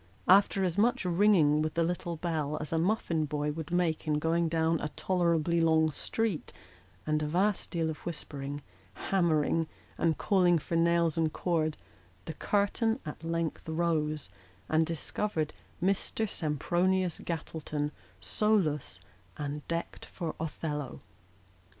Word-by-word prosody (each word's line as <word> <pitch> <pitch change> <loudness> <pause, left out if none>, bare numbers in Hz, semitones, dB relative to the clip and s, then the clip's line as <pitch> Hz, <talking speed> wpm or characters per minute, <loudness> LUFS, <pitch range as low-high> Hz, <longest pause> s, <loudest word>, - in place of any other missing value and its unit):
After 195 +1 +5
as 180 +1 0
much 235 -1 +2
ringing 170 -5 +4
with 155 0 -2
the 170 - +3
little 175 0 -2
bell 155 -3 -2
as 155 +1 -4
a 160 - +2
muffin 170 -4 +1
boy 150 0 -1
would 160 +1 -6
make 175 -2 0
in 150 -1 +2
going 165 +2 +1
down 160 0 +2
a - - -2
tolerably 170 -2 +1
long 160 -1 +4
street, 210 +3 -2 0.5
and 155 0 +1
a 150 - -1
vast 190 +6 +1
deal 165 -2 -1
of 160 -1 -4
whispering, 145 -3 -5 0.3
hammering, 165 -3 +1 0.3
and 160 -3 +2
calling 180 -3 +4
for 165 +2 -3
nails 170 -1 +3
and 160 -1 +2
cord, 160 -3 0 0.5
the 160 - -5
curtain 210 - +1
at 150 +1 -7
length 165 -1 -2
rose, 155 -2 0 0.4
and 160 0 +2
discovered 165 0 -2 0.3
Mr. 195 +4 0
Sempronius 175 +3 0
Gattleton 155 -2 -3 0.3
solus, 155 - +1 0.4
and 145 0 -4
decked 170 0 -4
for 165 -4 -5
Othello. 150 -3 -4
165 Hz, 135 wpm, -30 LUFS, 155-175 Hz, 0.5 s, After